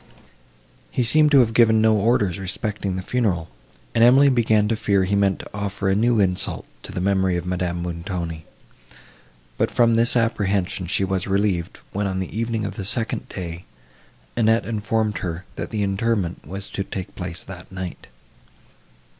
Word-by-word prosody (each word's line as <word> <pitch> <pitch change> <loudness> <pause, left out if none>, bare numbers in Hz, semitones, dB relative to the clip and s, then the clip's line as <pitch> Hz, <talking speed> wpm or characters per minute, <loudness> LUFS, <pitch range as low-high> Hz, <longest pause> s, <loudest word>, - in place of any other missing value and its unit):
He 125 - 0
seemed 150 +6 +4
to 140 -3 +7
have 115 -2 +1
given 110 -1 +5
no 110 0 +4
orders 105 -4 +2
respecting 100 0 -3
the 95 - -4
funeral, 95 - -1 0.4
and 115 - +4
Emily 135 +4 +7
began 110 -4 +3
to 115 - +1
fear 100 -3 +2
he 100 +2 0
meant 100 -1 +2
to - - -11
offer 100 -1 -3
a - - +3
new 115 +2 +3
insult 90 -2 0 0.2
to - - -9
the - - -4
memory 95 -1 +2
of 85 - -4
Madame 90 -1 -2
Montoni; 85 -1 -4 1.2
but - - +2
from 115 -1 +3
this 115 +2 +3
apprehension 100 -5 0
she 95 - 0
was 95 0 -1
relieved, 95 -3 0
when, 100 +1 -1
on 95 -1 -2
the 95 +1 -4
evening 115 -1 -1
of 100 -1 -5
the 100 - -3
second 115 +3 -2
day, 85 -2 -6 0.7
Annette 115 0 +3
informed 110 -1 -1
her, 90 0 -4
that - - -5
the 105 -2 -1
interment 100 -2 -1
was 100 +1 -6
to 100 - -3
take 95 -1 -6
place 90 -2 -4
that 90 -1 -11
night. 95 -2 -6
100 Hz, 170 wpm, -23 LUFS, 90-110 Hz, 1.2 s, to